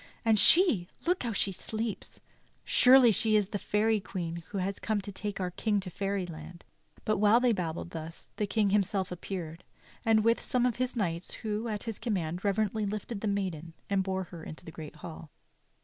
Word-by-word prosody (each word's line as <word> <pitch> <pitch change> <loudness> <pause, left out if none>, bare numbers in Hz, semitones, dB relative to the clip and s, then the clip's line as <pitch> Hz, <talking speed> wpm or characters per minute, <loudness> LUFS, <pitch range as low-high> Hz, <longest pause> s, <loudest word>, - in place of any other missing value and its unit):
And 220 -2 +5
she 325 - +6
— - - -27
look 355 +2 +2
how 235 - -1
she 200 -2 0
sleeps! 220 +3 -5 0.5
Surely 255 -2 +7
she 220 +1 +3
is 205 -2 +2
the 205 - -3
Fairy 215 +2 +1
Queen 175 -5 -4
who 205 - -5
has 195 +1 -2
come 215 +1 0
to 200 0 -6
take 205 +1 -4
our 180 -1 -2
King 205 +3 0
to 185 -2 -6
fairy 195 0 -2
land." 170 0 -10 0.4
But 215 - +2
while 215 +3 +6
they 250 -1 +3
babbled 175 -4 -3
thus 165 0 -8
the 210 - 0
King 205 -1 +1
himself 195 -1 +1
appeared, 175 -2 -6 0.4
and 220 -1 +4
with 230 +1 +3
him - - -12
some 250 -1 +1
of 245 -3 0
his 255 0 -1
knights 175 -6 -2
who, 215 +2 -1
at 210 -2 -3
his 225 -3 -5
command, 180 -6 -2
reverently 210 +1 0
lifted 210 +1 -4
the 220 - -1
maiden 180 -5 -2 0.2
and 195 -1 +3
bore 190 0 -2
her 170 -2 -10
into 160 +3 -9
the 160 - -8
great 155 -1 -9
hall. 160 0 -9
200 Hz, 205 wpm, -30 LUFS, 180-220 Hz, 0.5 s, Surely